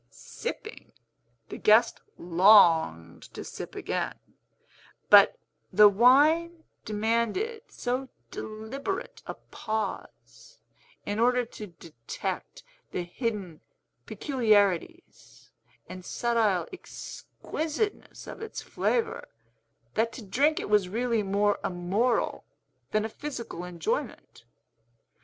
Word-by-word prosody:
Sipping, 115 - -8 0.6
the - - -7
guest 225 +2 +4 0.2
longed 165 - +4
to - - -6
sip - - -8
again; - - -2 1.0
but - - +8 0.3
the 210 0 +8
wine 300 - +4 0.2
demanded 235 - -1
so 255 +2 -3 0.2
deliberate 240 - -5
a - - -5
pause, 220 - -6 0.5
in 205 +1 -2
order 250 +1 +3
to 215 -2 -9
detect 160 -9 -7 0.3
the 180 - -3
hidden 190 - -4 0.5
peculiarities 220 - 0 0.4
and 185 0 -9
subtile 220 -3 0
exquisiteness 355 +1 -5
of - - -9
its 445 - -6
flavor, 460 -2 -1 0.7
that 230 +1 +1
to 235 - -9
drink 285 +10 +2
it - - -4
was 205 -3 +2
really 230 +2 0
more 205 +1 +1
a - - 0
moral 195 +7 0 0.5
than 215 0 0
a - - -1
physical 235 - -7
enjoyment. 175 -2 -4
220 Hz, 95 wpm, -28 LUFS, 190-260 Hz, 1.0 s, but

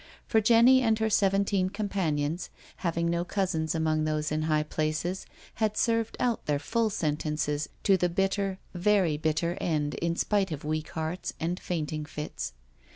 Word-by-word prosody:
For 220 - +3
Jenny 235 +4 +6
and 225 -3 +3
her 220 0 0
seventeen 195 -1 +2
companions, 175 -6 -1 0.3
having 170 -1 -1
no 170 0 0
cousins 175 -4 -1
among 155 -1 +1
those 155 0 -1
in 155 +1 0
high 155 -1 +2
places, 155 +4 -2 0.3
had 215 -1 +1
served 230 -1 +1
out 240 -2 0
their 145 -1 +2
full 225 +8 0
sentences 150 -3 -1
to 195 -2 +5
the 180 0 +1
bitter 195 +2 0
— - - -32 0.2
very 190 -7 +3
bitter 155 +3 -1
end, 150 -3 0
in 170 0 -1
spite 200 0 +1
of 150 -1 -5
weak 155 0 -2
hearts 160 +3 -3
and 170 +3 -2
fainting 155 -3 -3
fits. 150 - -5
170 Hz, 160 wpm, -28 LUFS, 155-200 Hz, 0.3 s, Jenny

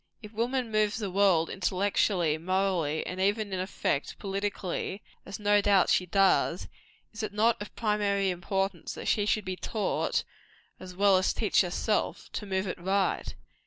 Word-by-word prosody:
If 210 +1 -10
woman 240 +1 -1
moves 215 0 +1
the 205 -4 -3
world, 185 -4 +3
intellectually, 185 -3 +1
morally, 180 -4 0
and 185 +1 -4
even, 205 +1 0
in 185 - -1
effect, 185 -6 -2
politically 195 -1 -3 0.2
as 195 - -6
no 205 0 +3
doubt 200 -2 +4
she 180 - +2
does 195 +2 +2 0.5
is 220 - -6
it 215 -1 -3
not 220 +2 +2
of 205 - -8
primary 205 -3 +1
importance 190 0 -3
that - - -7
she 210 0 +2
be 185 -2 -4
taught, 210 +3 -1 0.6
as 180 -1 -10
well 200 0 +5
as 185 - +1
teach 215 - +2
herself, 195 +4 -1
to 210 - -4
move 190 0 -1
it 180 - -4
right? 190 +2 0
195 Hz, 160 wpm, -28 LUFS, 185-210 Hz, 0.6 s, well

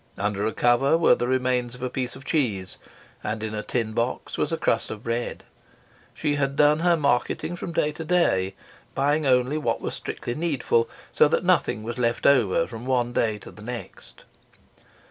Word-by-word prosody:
Under 105 +1 -1
a - - 0
cover 120 +7 +3
were 165 - +5
the 120 - -1
remains 125 -1 0
of 125 - -9
a 130 - -1
piece 125 -1 -3
of 135 +1 -12
cheese, 105 - -1 0.4
and 110 +1 -3
in 110 0 -3
a 105 - -2
tin 110 -1 -2
box 115 +2 -2
was - - -1
a - - 0
crust - - 0
of 110 0 -7
bread. 115 +1 -3 0.7
She 150 -1 0
had 140 -1 0
done 150 +1 +4
her 170 0 +3
marketing 140 +4 0
from 175 - -6
day 150 -2 +1
to 160 +2 -7
day, 100 - +2 0.4
buying 145 +2 +1
only 130 +3 +3
what 115 -6 -1
was - - -4
strictly 120 - -5
needful, 140 -7 0 0.2
so - - +5
that - - 0
nothing 110 - +2
was 120 +2 -5
left 120 -1 0
over 120 -12 +4
from 115 +1 -8
one 120 -2 +1
day 110 -3 +1
to - - -12
the 105 - -14
next. 120 +2 -8
125 Hz, 190 wpm, -25 LUFS, 115-145 Hz, 0.7 s, were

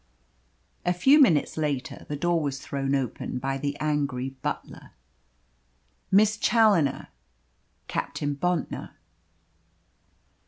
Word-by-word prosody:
A 180 - +1
few 270 +12 +5
minutes 165 - +3
later 145 -4 -3
the 145 - -2
door 170 +3 +1
was 140 -2 -2
thrown 140 0 -2
open 130 -1 -3
by 135 +2 -2
the 145 +1 -3
angry 140 -4 -1
butler. - - -6 1.2
"Miss 210 +2 +4
Challoner 210 - +3 0.8
Captain 145 0 -2
Bontnor." 180 +4 -2
145 Hz, 95 wpm, -26 LUFS, 140-180 Hz, 1.2 s, few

